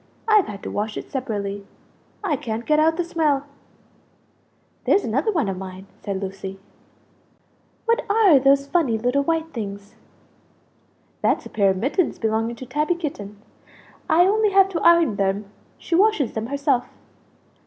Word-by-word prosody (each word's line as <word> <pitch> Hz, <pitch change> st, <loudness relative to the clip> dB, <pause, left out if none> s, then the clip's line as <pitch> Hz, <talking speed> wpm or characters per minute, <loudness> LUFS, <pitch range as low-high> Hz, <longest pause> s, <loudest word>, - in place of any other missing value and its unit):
I've 430 Hz, -3 st, +4 dB
had 200 Hz, -1 st, -8 dB
to -, -, -5 dB
wash 210 Hz, +1 st, -3 dB
it -, -, -8 dB
separately, 205 Hz, -6 st, -3 dB, 0.6 s
I 345 Hz, -7 st, +1 dB
can't 230 Hz, -2 st, -5 dB
get 305 Hz, 0 st, +3 dB
out 320 Hz, +1 st, +3 dB
the 350 Hz, -, +1 dB
smell." 305 Hz, -5 st, 0 dB, 1.4 s
"There's 400 Hz, -, +3 dB
another 275 Hz, -, 0 dB
one 320 Hz, -, 0 dB
of 190 Hz, -1 st, -3 dB
mine," 190 Hz, 0 st, -8 dB, 0.2 s
said 200 Hz, -2 st, -3 dB
Lucie. 195 Hz, 0 st, -6 dB, 1.3 s
"What 465 Hz, +1 st, +2 dB
are 405 Hz, -9 st, +5 dB
those 275 Hz, +1 st, +3 dB
funny 280 Hz, -7 st, +1 dB
little 245 Hz, +5 st, +1 dB
white 325 Hz, +2 st, -1 dB
things?" 200 Hz, -2 st, -6 dB, 1.3 s
"That's -, -, +1 dB
a -, -, -10 dB
pair 200 Hz, -2 st, +3 dB
of 190 Hz, -, 0 dB
mittens 285 Hz, -, 0 dB
belonging 225 Hz, +1 st, -1 dB
to 255 Hz, -, -9 dB
Tabby 300 Hz, +7 st, 0 dB
Kitten; 210 Hz, -, -6 dB, 0.7 s
I 350 Hz, +2 st, +5 dB
only 425 Hz, +2 st, +3 dB
have 390 Hz, -1 st, +5 dB
to 350 Hz, -4 st, -3 dB
iron 335 Hz, -10 st, +4 dB
them; 195 Hz, +1 st, 0 dB, 0.3 s
she -, -, -6 dB
washes 365 Hz, -, +3 dB
them 220 Hz, +1 st, -3 dB
herself." 280 Hz, -2 st, 0 dB
275 Hz, 155 wpm, -22 LUFS, 210-335 Hz, 1.4 s, are